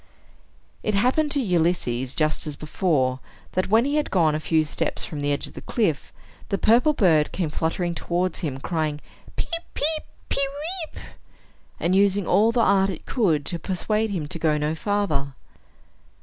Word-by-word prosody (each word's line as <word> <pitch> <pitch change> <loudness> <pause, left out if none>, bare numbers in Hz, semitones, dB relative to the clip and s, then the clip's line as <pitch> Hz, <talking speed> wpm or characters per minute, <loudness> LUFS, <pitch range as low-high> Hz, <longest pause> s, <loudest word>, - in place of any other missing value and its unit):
It 215 - -1
happened 255 +9 +2
to 285 - +1
Ulysses, 165 - 0
just 155 0 +1
as 150 - -3
before, 145 -5 0 0.3
that, 185 +1 -1
when 225 +4 +4
he 285 +2 +1
had 300 - 0
gone 165 -5 +3
a 155 - 0
few 160 0 +2
steps 150 - -2
from 150 - -6
the 145 0 0
edge 145 - -1
of - - -9
the - - -8
cliff, 170 - -1 0.4
the 195 - +1
purple 240 +10 +4
bird 165 - +3
came 170 -5 -2
fluttering 170 +2 -1
towards 175 +2 -1
him, 140 -6 -3
crying, 155 -1 -2 0.4
"Peep, 335 -1 -2
peep, 310 +1 -1 0.2
pe - - -1
weep!" 310 +5 -4 0.8
and 180 +2 +1
using 200 0 +3
all 210 +7 +4
the 235 0 +2
art 195 -2 +4
it 180 - -6
could 165 - +1
to 170 - -3
persuade 210 +5 -1
him 170 -7 -3
to 165 - -4
go 155 -2 +2
no 150 +1 0
farther. 160 -7 -1
180 Hz, 175 wpm, -24 LUFS, 155-220 Hz, 0.8 s, when